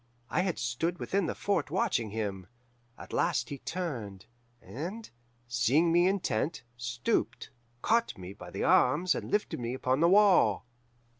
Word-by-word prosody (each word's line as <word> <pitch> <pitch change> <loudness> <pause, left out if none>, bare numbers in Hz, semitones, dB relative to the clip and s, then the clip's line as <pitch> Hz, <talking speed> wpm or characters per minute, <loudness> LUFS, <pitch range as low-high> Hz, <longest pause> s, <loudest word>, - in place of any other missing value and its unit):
I - - +2
had 185 -2 -1
stood 120 +9 -2
within 195 0 -1
the - - -3
fort 180 -9 -1
watching 175 - 0
him. 100 -4 -4 0.5
At - - -11
last - - +1
he 140 - -6
turned, 120 - -5 0.3
and, 170 - -7 0.4
seeing 130 +8 +2
me 175 +2 +4
intent, 175 - -1
stooped, 120 0 -2 0.3
caught 230 +1 +1
me 95 +1 -8
by 90 -3 -11
the - - -4
arms, 165 +8 +4
and - - -5
lifted 210 -8 -1
me 120 +1 -3
upon 130 +1 0
the 170 +2 +4
wall. 200 -7 +5
145 Hz, 150 wpm, -30 LUFS, 115-185 Hz, 0.5 s, wall